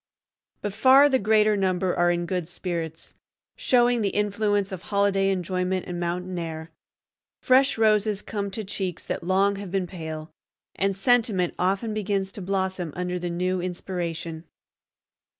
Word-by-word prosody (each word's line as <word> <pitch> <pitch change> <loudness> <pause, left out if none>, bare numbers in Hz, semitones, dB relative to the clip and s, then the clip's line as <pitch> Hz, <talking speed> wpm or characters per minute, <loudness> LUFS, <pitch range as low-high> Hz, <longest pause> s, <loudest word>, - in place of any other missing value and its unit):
But 205 - -2
far 265 +6 +6
the 260 -2 +2
greater 215 0 +3
number 185 -2 0
are 175 0 +3
in 175 0 0
good 180 -2 -2
spirits, 165 -3 -5 0.4
showing 245 - +3
the 200 - +1
influence 205 -1 0
of 185 -2 -6
holiday 200 -1 +1
enjoyment 185 0 -1
and 175 -1 -4
mountain 180 +1 -3
air. 160 -1 -6 0.7
Fresh 260 0 +4
roses 215 -2 +2
come 200 -2 -3
to 215 +3 -4
cheeks 185 -3 -4
that - - -4
long 195 +3 +2
have 200 -1 -6
been 190 0 -1
pale, 160 -3 -7 0.4
and 195 0 0
sentiment 205 -4 +2
often 195 +4 0
begins 200 -2 -1
to 200 - -8
blossom 190 -3 -2
under 180 0 -2
the 175 0 -3
new 180 +1 -1
inspiration. 170 -2 -4
190 Hz, 150 wpm, -25 LUFS, 175-205 Hz, 0.7 s, far